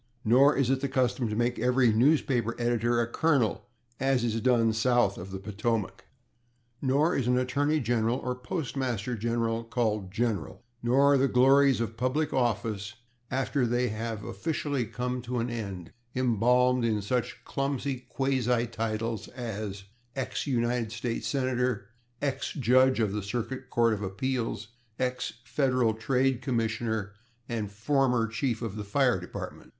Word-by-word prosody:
Nor 130 +6 +6
is 135 -2 +2
it 135 0 +1
the 140 - 0
custom 125 -2 +1
to 105 - -2
make 120 +2 0
every 125 0 +3
newspaper 120 -2 +2
editor 120 0 +1
a - - +1
colonel, 125 -4 +1 0.3
as 135 -2 +2
is 115 -1 0
done 115 -3 +3
south 115 -3 +2
of 90 +2 -8
the 95 - -5
Potomac. 105 +2 -2 0.8
Nor 145 +5 +2
is 125 - 0
an 125 0 +3
attorney 145 +4 +1
general 120 -1 +1
or 125 -2 -2
postmaster 125 - -3
general 115 +1 -1
called 110 -5 -1
/General/. 105 -7 -1 0.2
Nor 135 +4 +4
are - - +5
the 135 - +4
glories 135 +1 +5
of 115 -1 -3
public 140 +5 0
office, 115 -4 -1 0.3
after 135 +1 0
they 120 +1 +1
have 110 0 -4
officially 140 +2 -2
come 125 +3 -3
to 125 +1 -4
an 120 +1 -1
end, 100 -7 -5 0.2
embalmed 125 +1 +3
in 110 -3 0
such 125 +4 -2
clumsy 135 -1 -2
quasi 125 -3 +1
titles 115 -1 -3
as 110 -5 -5 0.3
/ex 135 +2 -3
United 120 -3 0
States 115 0 -3
Senator/, 125 -5 -1 0.3
/ex 140 +2 -2
Judge 130 +1 +4
of 110 -3 +1
the 105 +1 -2
Circuit 125 +5 -4
Court 115 -1 +3
of 105 - -3
Appeals/, 110 +2 -2 0.3
/ex 125 -2 -1
Federal 125 -5 +1
Trade 130 +3 +1
Commissioner/ 110 -4 -1 0.3
and 110 -4 -3
/former 125 +2 +1
Chief 115 +1 -2
of 110 -2 -4
the 105 - -4
Fire 120 +1 +2
Department 90 - -8
120 Hz, 150 wpm, -28 LUFS, 110-130 Hz, 0.8 s, Nor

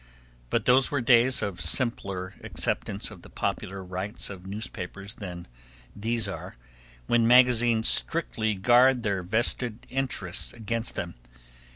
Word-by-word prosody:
But 115 - 0
those 130 +1 +5
were 145 - 0
days 125 +1 +4
of 95 -4 -3
simpler 95 -1 -1
acceptance 100 +2 -3
of 100 -5 -12
the - - -14
popular 95 0 -3
rights 95 +5 -5
of 95 -1 -9
newspapers 100 -1 -6
than 90 -6 -8 0.5
these 110 +1 -1
are, 100 - -6 0.5
when 115 - +3
magazines 120 -2 +5
strictly 110 -10 0
guard 120 +5 +5
their 100 -3 0
vested 110 +4 -1
interests 125 -9 -2
against 115 0 -3
them. - - -4
110 Hz, 130 wpm, -27 LUFS, 95-120 Hz, 0.5 s, those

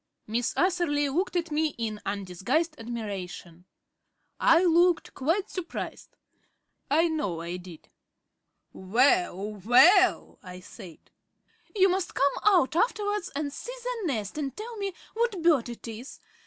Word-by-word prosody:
Miss 230 +2 -2
Atherley 345 -6 +1
looked 360 +7 -1
at 340 -2 -1
me 305 0 0
in 215 -2 -4
undisguised 200 - -1
admiration. 190 -7 -7 0.7
I 330 +2 +5
looked 350 0 +3
quite 330 +9 0
surprised 365 -3 -6 0.7
I 320 +4 +3
know 205 - -2
I 170 +2 -5
did. 180 -3 -12 0.9
"Well, 215 - +1
well!" 360 - +5
I 180 0 -10
said. 185 -2 -13 0.6
"You 385 -2 +5
must 370 -1 -1
come 280 +1 +3
out 365 -9 +4
afterwards 415 -1 0
and 285 -1 -3
see - - -7
the 485 -6 -3
nest 220 -1 -3
and 275 -3 -4
tell 455 +2 -7
me 395 -2 -3 0.2
what 460 -4 0
bird 300 -8 +3
it 235 0 -9
is. 230 +4 -9
290 Hz, 130 wpm, -27 LUFS, -, 0.9 s, I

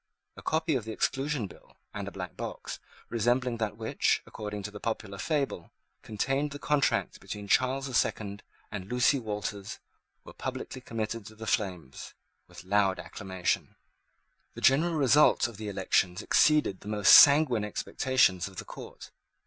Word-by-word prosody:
A - - -11
copy 160 0 0
of 130 -5 0
the 110 - -5
Exclusion 135 +2 -1
Bill, 95 - -15 0.2
and 100 -1 -5
a - - -5
black 90 -3 -7
box, - - -6 0.3
resembling 120 +2 +1
that 110 -2 -3
which, 110 -1 0
according 105 -1 -6
to 105 - -5
the 105 - -9
popular 100 -3 -4
fable, 140 - -2 0.3
contained 135 +7 -1
the 145 - -7
contract 145 -1 0
between 105 -1 -7
Charles 130 +5 +2
the 130 - -6
Second 100 -3 -1 0.3
and 100 -2 -6
Lucy 125 +3 +3
Walters, 105 -3 -5 0.5
were - - -12
publicly 130 - -6
committed 115 -3 -4
to 110 - -12
the 110 +1 -8
flames, 90 - -3 0.3
with - - -12
loud 95 0 +2
acclamations. 95 -4 -3 0.8
The - - -8
general 160 +6 +4
result 145 -2 +4
of 115 -4 -11
the 105 -1 -5
elections 95 -2 0
exceeded 150 -11 +3
the - - -12
most 105 -1 +5
sanguine 140 -6 +8
expectations 105 -3 +1
of 95 - -13
the - - -7
court. - - -11
110 Hz, 155 wpm, -29 LUFS, 100-135 Hz, 0.8 s, sanguine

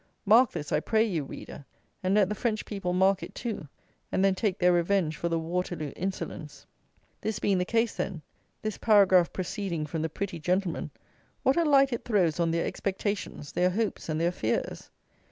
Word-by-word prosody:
Mark 225 +4 +6
this, 145 - -5
I - - +3
pray 220 -1 +2
you, 180 -9 -1
reader; 140 +1 -9 0.4
and 185 +2 +1
let 205 -3 +5
the 210 - -2
French 215 0 -1
people 195 -4 -3
mark 190 +1 +3
it, - - -8
too, 220 -10 -4 0.4
and 190 - +2
then 195 - +4
take 190 0 -1
their 180 0 +4
revenge 175 -2 +1
for 170 - -2
the 165 - +1
Waterloo 165 -2 -3
insolence. 190 +1 -5 0.6
This 215 -1 -2
being 195 -2 +1
the 180 - 0
case, 230 +2 +1
then; 175 -6 -3 0.4
this 215 -1 -3
paragraph 190 -5 +5
proceeding 185 -4 -3
from 155 +1 -3
the 160 - -1
pretty 180 +1 -4
gentlemen, 180 +2 -1 0.5
what 265 - +4
a 340 - +3
light 275 -4 +4
it 235 - -3
throws 180 -8 +1
on 170 -1 +2
their 165 0 0
expectations, 195 -6 -3
their 180 +1 +2
hopes, 210 -2 -2
and 155 0 -1
their 170 +1 +2
fears. 115 -9 -2
190 Hz, 190 wpm, -28 LUFS, 170-210 Hz, 0.6 s, Mark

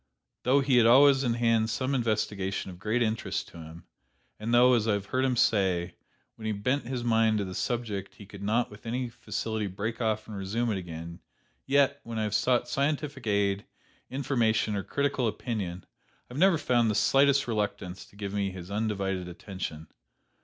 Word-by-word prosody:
Though 135 +3 +3
he 135 -2 +3
had 115 -2 +6
always 135 +2 +6
in 120 -3 +1
hand 115 -2 +2
some 130 +4 -1
investigation 105 -6 -1
of 90 - -12
great 110 +5 +1
interest 110 0 -2
to - - -13
him, 80 +1 -10 0.6
and 110 +2 -3
though, 125 +1 +6
as 115 -2 +2
I 110 - +3
have 100 -1 -2
heard 130 +5 0
him 130 -1 +2
say, 95 -7 +2 0.4
when 110 -1 -6
he 110 - 0
bent 125 +8 -1
his 125 -2 -3
mind 110 -2 +3
to 100 - -1
the 95 - -6
subject 105 -4 -3
he 100 - -12
could 100 0 -11
not 110 +4 0
with 105 +2 -12
any 125 +1 -2
facility 110 -2 -3
break 110 +5 -4
off 110 -1 0
and 110 - -7
resume 110 +5 -1
it 100 - -1
again, 85 -1 -8 0.5
yet, 140 0 +3
when 115 -1 -6
I 110 - 0
have 105 -1 -2
sought 120 +3 +2
scientific 140 -1 -2
aid, 100 -1 +1 0.4
information 115 -6 +1
or 100 - -1
critical 140 0 0
opinion, 100 -6 -4 0.5
I - - -8
never 175 +5 +4
found 120 -6 +2
the 105 - 0
slightest 140 +5 +4
reluctance 105 -5 -3
to - - -22
give 100 -1 -5
me 100 -1 0
his 90 0 -9
undivided 100 -4 -1
attention. 90 -3 -6
110 Hz, 190 wpm, -28 LUFS, 100-125 Hz, 0.6 s, had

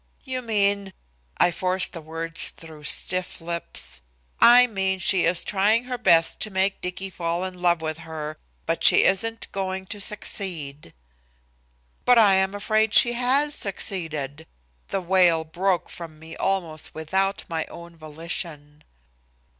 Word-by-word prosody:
"You 260 -2 -4
mean 200 -4 0 0.2
" - - -40
I 175 - +4
forced 185 +1 +1
the 165 - -7
words 165 +1 +2
through 155 -2 -12
stiff 185 +3 0
lips. 165 - -4 0.4
"I 245 +1 +8
mean 190 -4 -1
she 190 -1 +2
is 170 +1 +2
trying 210 +4 +2
her 250 -1 -5
best 170 -7 +3
to 215 - -1
make 190 0 0
Dicky 190 +1 -5
fall 170 0 -3
in 180 -1 -8
love 175 -2 +2
with 155 0 -4
her, 155 -2 -7 0.3
but - - -2
she - - +7
isn't 225 +4 0
going 190 -1 -4
to 205 +1 -6
succeed." 165 - -3 1.1
"But 245 -1 +5
I 210 -4 +6
am 190 +1 +1
afraid 215 +1 +1
she 240 -2 +6
has 265 +5 +1
succeeded!" 160 - -4 0.4
The 195 - -2
wail 175 -3 +3
broke 180 +3 -1
from 165 -3 -9
me 160 +1 -11
almost 170 -6 -3
without 190 +5 -1
my 160 -1 -3
own 170 0 -12
volition. 155 -1 -6
185 Hz, 145 wpm, -24 LUFS, 160-200 Hz, 1.1 s, I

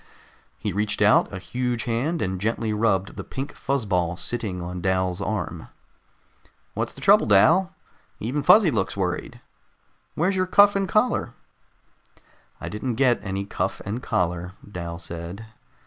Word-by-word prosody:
He - - -3
reached 105 +1 -1
out 105 - +4
a 100 - -5
huge 125 +4 -2
hand 130 +8 -1
and 95 0 -3
gently 110 0 -1
rubbed 100 -3 0
the - - -4
pink 135 +2 -6
fuzz 135 -3 -2
ball 90 -3 0
sitting 105 -6 -3
on 90 +1 -5
Dal's 95 0 0
arm. 110 +1 -3 1.1
"What's - - -3
the - - -12
trouble, - - +5
Dal? 165 - +4 0.4
Even 130 +7 -2
Fuzzy 185 +4 +6
looks 100 -5 -1
worried. 90 -2 -3 0.7
Where's 180 +5 +1
your 185 0 +1
cuff 205 +2 +6
and 195 -2 0
collar?" 215 +6 +1 1.2
"I - - -6
didn't 115 +3 -3
get 125 -1 +3
any 95 0 -3
cuff - - -3
and 110 +5 -3
collar," 90 -2 -1
Dal 85 -4 -6
said. 85 +6 -8
105 Hz, 145 wpm, -24 LUFS, 95-135 Hz, 1.2 s, Fuzzy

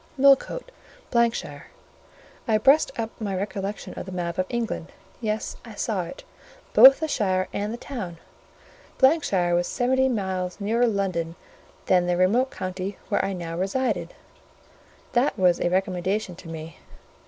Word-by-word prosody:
Millcote, 280 - +3 0.6
——shire; - - -7 0.8
I 220 -2 +4
brushed 275 +8 +4
up 225 0 -2
my 200 -3 -2
recollections 200 +1 -4
of - - -6
the - - -6
map 175 -1 -3
of 185 - 0
England; 230 -8 -3 0.3
yes, 215 -1 -2
I - - -11
saw - - -1
it; - - -10 0.5
both 270 +1 +9
the 315 - 0
shire 190 -9 0
and 205 +1 -2
the 235 - -4
town. 215 -11 -6 0.8
——shire 205 - +3
was 175 0 +2
seventy 260 +2 +2
miles 190 -5 -2
nearer 230 +4 +2
London 185 -6 -1 0.5
than 180 -1 +3
the 175 0 +1
remote 225 +9 +3
county 185 0 -5
where - - +1
I 195 - -1
now 170 -2 -5
resided: 195 -1 -1 1.0
that 240 -4 +2
was 180 -3 +3
a 175 - +2
recommendation 185 +1 -1
to 185 - -12
me. 160 0 -8
195 Hz, 145 wpm, -25 LUFS, 180-240 Hz, 1.0 s, both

